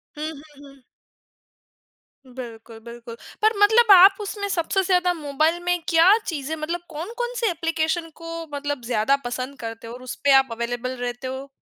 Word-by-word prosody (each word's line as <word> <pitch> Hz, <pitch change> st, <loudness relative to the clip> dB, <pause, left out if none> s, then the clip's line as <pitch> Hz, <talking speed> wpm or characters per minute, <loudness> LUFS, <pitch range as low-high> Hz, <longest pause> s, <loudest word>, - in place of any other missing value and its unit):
हुँ, 305 Hz, +1 st, -4 dB
हुँ, 295 Hz, -1 st, -15 dB
हुँ। 275 Hz, -1 st, -18 dB, 1.4 s
बिल्कुल, 235 Hz, -3 st, -10 dB
बिल्कुल। 235 Hz, 0 st, -10 dB, 0.3 s
पर 435 Hz, +1 st, +4 dB
मतलब 440 Hz, +2 st, +6 dB
आप 385 Hz, +2 st, +8 dB
उसमें 405 Hz, 0 st, -4 dB
सबसे 375 Hz, +1 st, 0 dB
ज़्यादा 360 Hz, -1 st, +2 dB
मोबाइल 310 Hz, +1 st, 0 dB
में 355 Hz, 0 st, 0 dB
क्या 340 Hz, +5 st, +6 dB
चीज़ें 310 Hz, -1 st, -3 dB
मतलब 320 Hz, +3 st, -4 dB
कौन-कौन 455 Hz, +10 st, -5 dB
से 460 Hz, -, +1 dB
एप्लीकेशन 330 Hz, 0 st, -2 dB
को 330 Hz, 0 st, -7 dB
मतलब 285 Hz, -1 st, -3 dB
ज़्यादा 235 Hz, +3 st, +2 dB
पसंद 255 Hz, +2 st, -5 dB
करते 225 Hz, 0 st, -7 dB
हो 230 Hz, -, -8 dB
और 250 Hz, -, -10 dB
उसपे 265 Hz, +3 st, -1 dB
आप 265 Hz, -, -1 dB
अवेलेबल 240 Hz, +2 st, -3 dB
रहते 245 Hz, +1 st, -5 dB
हो? 265 Hz, +1 st, -6 dB
300 Hz, 160 wpm, -23 LUFS, 255-350 Hz, 1.4 s, आप